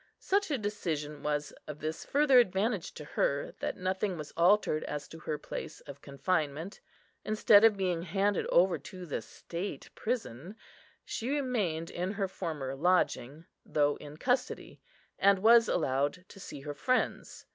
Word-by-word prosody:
Such 400 Hz, 0 st, 0 dB
a 285 Hz, -, +1 dB
decision 155 Hz, -, -3 dB
was 150 Hz, -1 st, -2 dB
of 150 Hz, -, -6 dB
this 155 Hz, +1 st, -4 dB
further 280 Hz, -3 st, +5 dB
advantage 200 Hz, -2 st, 0 dB
to 150 Hz, -, -8 dB
her, 140 Hz, -1 st, -1 dB
that -, -, -3 dB
nothing 185 Hz, 0 st, -1 dB
was 150 Hz, -2 st, -7 dB
altered 175 Hz, -3 st, +3 dB
as 145 Hz, -1 st, -5 dB
to 165 Hz, -, -10 dB
her 155 Hz, -1 st, -3 dB
place -, -, -7 dB
of 140 Hz, 0 st, -11 dB
confinement. 155 Hz, +3 st, -2 dB, 0.4 s
Instead 215 Hz, -1 st, +5 dB
of 220 Hz, -3 st, +6 dB
being 180 Hz, -3 st, 0 dB
handed 195 Hz, +3 st, 0 dB
over 180 Hz, +1 st, +4 dB
to 185 Hz, -2 st, -9 dB
the 155 Hz, -, -3 dB
state 175 Hz, +4 st, -7 dB
prison, 205 Hz, -, -4 dB, 0.5 s
she 235 Hz, -, -4 dB
remained 220 Hz, -, -1 dB
in 180 Hz, +3 st, -2 dB
her 200 Hz, -2 st, -1 dB
former 155 Hz, -8 st, -4 dB
lodging, 160 Hz, -2 st, +1 dB, 0.2 s
though 145 Hz, -1 st, +1 dB
in 150 Hz, 0 st, -10 dB
custody, 250 Hz, +6 st, -1 dB, 0.4 s
and 200 Hz, 0 st, +5 dB
was 230 Hz, 0 st, +7 dB
allowed 145 Hz, +3 st, 0 dB
to -, -, -13 dB
see 145 Hz, -6 st, -8 dB
her 145 Hz, +1 st, -5 dB
friends. 255 Hz, -, -1 dB
180 Hz, 155 wpm, -31 LUFS, 150-210 Hz, 0.5 s, was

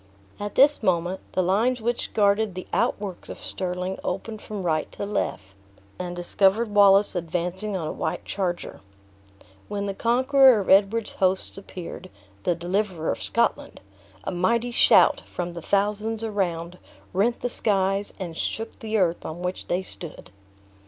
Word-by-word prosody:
At 205 Hz, 0 st, -5 dB
this 285 Hz, +2 st, +5 dB
moment, 180 Hz, -2 st, +1 dB
the 185 Hz, -, +2 dB
lines 225 Hz, +8 st, +2 dB
which 240 Hz, +2 st, -2 dB
guarded 205 Hz, -1 st, +2 dB
the 185 Hz, -, -6 dB
outworks 195 Hz, -4 st, -1 dB
of -, -, -7 dB
Stirling 180 Hz, 0 st, -3 dB
opened 210 Hz, +4 st, -4 dB
from 205 Hz, -3 st, -6 dB
right 155 Hz, -3 st, 0 dB
to -, -, -4 dB
left, 95 Hz, -, -3 dB, 0.5 s
and 175 Hz, -1 st, -4 dB
discovered 195 Hz, +5 st, +2 dB
Wallace 200 Hz, 0 st, +6 dB
advancing 180 Hz, +3 st, -2 dB
on 160 Hz, -4 st, -3 dB
a -, -, -2 dB
white -, -, -3 dB
charger. 180 Hz, -3 st, -3 dB, 0.9 s
When 200 Hz, -1 st, -3 dB
the 200 Hz, -, -2 dB
conqueror 260 Hz, +2 st, +5 dB
of 195 Hz, -, -1 dB
Edward's 205 Hz, +3 st, +4 dB
hosts 185 Hz, 0 st, 0 dB
appeared 185 Hz, -3 st, -8 dB, 0.3 s
the 175 Hz, -, +1 dB
deliverer 180 Hz, -1 st, -1 dB
of -, -, -4 dB
Scotland -, -, 0 dB, 0.4 s
a -, -, -3 dB
mighty 230 Hz, +7 st, +1 dB
shout, -, -, +5 dB
from 175 Hz, -1 st, -4 dB
the 170 Hz, -, -7 dB
thousands 210 Hz, +4 st, 0 dB
around, 180 Hz, -5 st, -2 dB, 0.3 s
rent 215 Hz, +6 st, +1 dB
the 245 Hz, -, 0 dB
skies, 195 Hz, -2 st, 0 dB
and 175 Hz, -4 st, -6 dB
shook 225 Hz, +6 st, -4 dB
the 220 Hz, 0 st, -1 dB
earth 175 Hz, -4 st, +1 dB
on 170 Hz, +3 st, -6 dB
which 180 Hz, +1 st, -4 dB
they 180 Hz, +2 st, 0 dB
stood. 170 Hz, -3 st, -9 dB
195 Hz, 150 wpm, -25 LUFS, 180-215 Hz, 0.9 s, Wallace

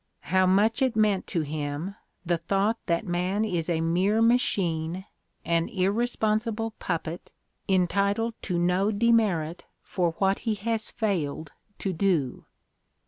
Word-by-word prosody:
How 185 Hz, 0 st, +5 dB
much 210 Hz, +5 st, +3 dB
it 260 Hz, -4 st, +2 dB
meant 210 Hz, -3 st, +2 dB
to 170 Hz, -, -1 dB
him, 150 Hz, +4 st, -4 dB, 0.3 s
the 170 Hz, -1 st, +1 dB
thought 195 Hz, +6 st, 0 dB
that 170 Hz, +3 st, 0 dB
man 185 Hz, +4 st, 0 dB
is 175 Hz, -5 st, -2 dB
a 165 Hz, -2 st, +1 dB
mere 185 Hz, +6 st, +2 dB
machine, 185 Hz, -7 st, +1 dB, 0.4 s
an 170 Hz, 0 st, +1 dB
irresponsible 220 Hz, +2 st, 0 dB
puppet, 170 Hz, 0 st, -4 dB, 0.4 s
entitled 200 Hz, +5 st, +1 dB
to 180 Hz, -3 st, -2 dB
no 180 Hz, +4 st, +2 dB
demerit 205 Hz, -7 st, +1 dB, 0.2 s
for 175 Hz, -3 st, -1 dB
what 195 Hz, 0 st, +2 dB
he 220 Hz, -2 st, -1 dB
has 220 Hz, +1 st, -2 dB
failed 160 Hz, -8 st, -2 dB, 0.3 s
to 195 Hz, -, -2 dB
do! 165 Hz, -8 st, 0 dB
190 Hz, 130 wpm, -27 LUFS, 170-215 Hz, 0.4 s, How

